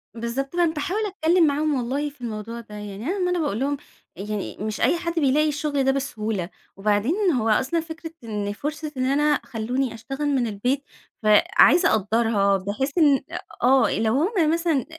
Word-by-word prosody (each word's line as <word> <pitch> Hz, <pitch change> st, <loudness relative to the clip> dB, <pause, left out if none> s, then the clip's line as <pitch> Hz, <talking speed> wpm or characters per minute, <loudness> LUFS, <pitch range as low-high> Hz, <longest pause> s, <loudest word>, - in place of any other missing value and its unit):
بالضبط، 240 Hz, +6 st, -4 dB
أنا 345 Hz, -2 st, +2 dB
باحاول 365 Hz, +8 st, -2 dB
أتكلم 355 Hz, -4 st, +2 dB
معاهم 300 Hz, +1 st, +1 dB
والله 270 Hz, +4 st, -1 dB
في 280 Hz, -2 st, -22 dB
الموضوع 230 Hz, 0 st, -5 dB
ده 225 Hz, -2 st, -11 dB
يعني 210 Hz, +1 st, -7 dB
أنا 385 Hz, +4 st, -1 dB
ما 360 Hz, -1 st, +1 dB
أنا 360 Hz, -, 0 dB
باقول 290 Hz, -10 st, -1 dB
لهم 285 Hz, +2 st, 0 dB, 0.4 s
يعني 205 Hz, +1 st, -5 dB
مش 215 Hz, +1 st, -4 dB
أي 345 Hz, -, +3 dB
حد 340 Hz, 0 st, -3 dB
بيلاقي 300 Hz, +1 st, +3 dB
الشغل 290 Hz, -1 st, -1 dB
ده 270 Hz, -, +3 dB
بسهولة، 220 Hz, -9 st, -3 dB, 0.3 s
وبعدين 215 Hz, -, +1 dB
هو 230 Hz, -6 st, 0 dB
أصلًا 265 Hz, +9 st, +2 dB
فكرة 325 Hz, 0 st, -7 dB
إن 205 Hz, -2 st, -3 dB
فرصة 300 Hz, +6 st, -5 dB
إن 255 Hz, -, 0 dB
أنا 295 Hz, +3 st, +2 dB
خلوني 245 Hz, +3 st, -2 dB
اشتغل 270 Hz, +6 st, -4 dB
من 265 Hz, -4 st, +1 dB
البيت، 245 Hz, +7 st, -1 dB, 0.4 s
فعايزة 245 Hz, -, +5 dB
أقدرها 210 Hz, -1 st, +2 dB
بحيث 210 Hz, -, -3 dB
إن 290 Hz, -6 st, +5 dB, 0.4 s
آه، 260 Hz, +2 st, +5 dB
لو 220 Hz, 0 st, +1 dB
هم 325 Hz, -, +2 dB
مثلًا 330 Hz, -6 st, 0 dB
270 Hz, 170 wpm, -24 LUFS, 220-310 Hz, 0.4 s, فعايزة